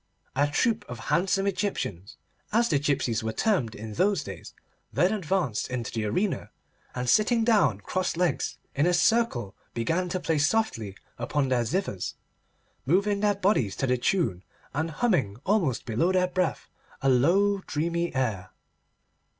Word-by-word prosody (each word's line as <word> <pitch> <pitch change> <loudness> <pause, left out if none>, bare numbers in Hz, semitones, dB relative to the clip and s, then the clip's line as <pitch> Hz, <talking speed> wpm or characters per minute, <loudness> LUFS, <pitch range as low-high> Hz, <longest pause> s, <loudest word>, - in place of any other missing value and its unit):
A 145 +2 +3
troop 220 - +1
of 125 - -6 0.2
handsome 195 +4 +2
Egyptians—as 200 - -2
the 145 - +3
gipsies 135 -6 0
were 110 - -1
termed 170 - +1
in 110 0 -7
those 200 - +1
days—then 180 +4 -3
advanced 180 - -1
into 125 -3 -3
the 110 -2 -2
arena, 185 - -1 0.5
and 125 0 -3
sitting 220 - +4
down 190 - +3
cross 185 - -2
legs, 170 -7 0 0.2
in 145 +5 +2
a 180 - +3
circle, 170 - +2 0.2
began 165 +10 0
to 185 - -1
play 160 -3 0
softly 145 - 0 0.2
upon 135 +3 0
their 125 -2 +2
zithers, 115 - -2 0.7
moving 200 +6 +2
their 205 0 +2
bodies 190 - +1
to - - -1
the 125 -1 +2
tune, 120 - 0 0.3
and 160 +4 -1
humming, 150 - 0
almost 185 - +1
below 125 +10 +1
their 185 -1 +3
breath, 180 -2 -1 0.4
a - - +2
low 180 +11 +4
dreamy 170 +3 -1
air. 105 -8 -1
165 Hz, 145 wpm, -27 LUFS, 120-195 Hz, 0.7 s, sitting